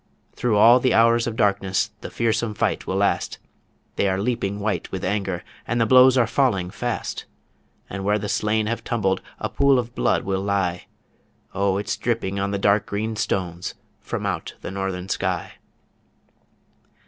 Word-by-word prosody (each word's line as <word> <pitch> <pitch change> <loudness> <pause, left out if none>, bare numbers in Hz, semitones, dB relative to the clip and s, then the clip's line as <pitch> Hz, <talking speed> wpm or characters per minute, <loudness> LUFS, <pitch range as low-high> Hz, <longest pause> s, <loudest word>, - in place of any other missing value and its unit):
Through 115 -3 +1
all 120 +4 +7
the 130 0 +2
hours 115 +1 +4
of 115 - -3
darkness 100 -3 +1
The - - -6
fearsome 115 -1 0
fight - - -1
will 95 - -1
last; 100 +1 0 0.6
They 100 - +2
are 95 0 0
leaping 100 -2 -1
white 105 0 -2
with 95 - -4
anger, 95 -2 -2 0.2
And 120 +1 0
the 115 - +4
blows 130 +2 +7
are 120 - +5
falling 105 -8 +1
fast 120 +2 -4 0.6
And 95 0 -5
where 105 +1 +2
the 105 0 -4
slain 105 +1 +1
have 115 +2 -3
tumbled 95 -5 0 0.2
A - - -2
pool 140 -1 +3
of 120 -1 -2
blood - - +1
will 95 0 -1
lie 95 -3 -1 0.7
O 100 0 +1
it's 100 0 -2
dripping 110 -5 -1
on 100 0 0
the 100 - -1
dark 100 +1 +2
green 110 +2 -2
stones 90 -4 -2 0.2
from - - -4
out - - -3
the - - -6
Northern 95 -1 -3
Sky. - - -2
105 Hz, 170 wpm, -23 LUFS, 95-115 Hz, 0.7 s, all